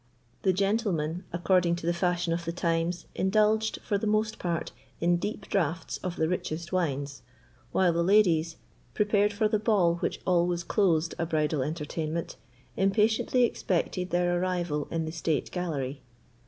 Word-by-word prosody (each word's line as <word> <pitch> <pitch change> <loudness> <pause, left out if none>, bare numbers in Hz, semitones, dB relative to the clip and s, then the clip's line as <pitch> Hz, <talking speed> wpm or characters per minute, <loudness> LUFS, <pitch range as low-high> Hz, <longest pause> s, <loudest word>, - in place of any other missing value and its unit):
The 190 - +3
gentlemen, 185 -4 0
according 175 0 +2
to 170 - -7
the 170 - +2
fashion 175 -1 0
of 170 +1 -2
the 170 - -1
times, 170 0 -1
indulged, 215 +3 +2
for 205 - 0
the 215 - -2
most 215 +1 0
part, 170 -2 -2 0.3
in 175 +1 +3
deep 205 +2 -4
draughts 165 -3 -1
of 180 -1 -4
the 160 - +1
richest 170 0 -3
wines, 140 -6 -1 0.5
while 180 -2 +3
the 170 - +1
ladies, 170 -4 +3 0.4
prepared 205 -1 +2
for 215 +1 +1
the 215 0 +1
ball 195 -6 +2
which - - -2
always 175 -1 +2
closed 170 -4 +1
a 170 - 0
bridal 155 -2 0
entertainment, 155 +2 -3 0.4
impatiently 220 +5 +2
expected 180 -4 -1
their 175 0 +1
arrival 175 -5 -1
in 165 -1 -2
the 160 - -4
state 160 -2 -1
gallery. 145 -7 -3
175 Hz, 155 wpm, -28 LUFS, 165-195 Hz, 0.5 s, The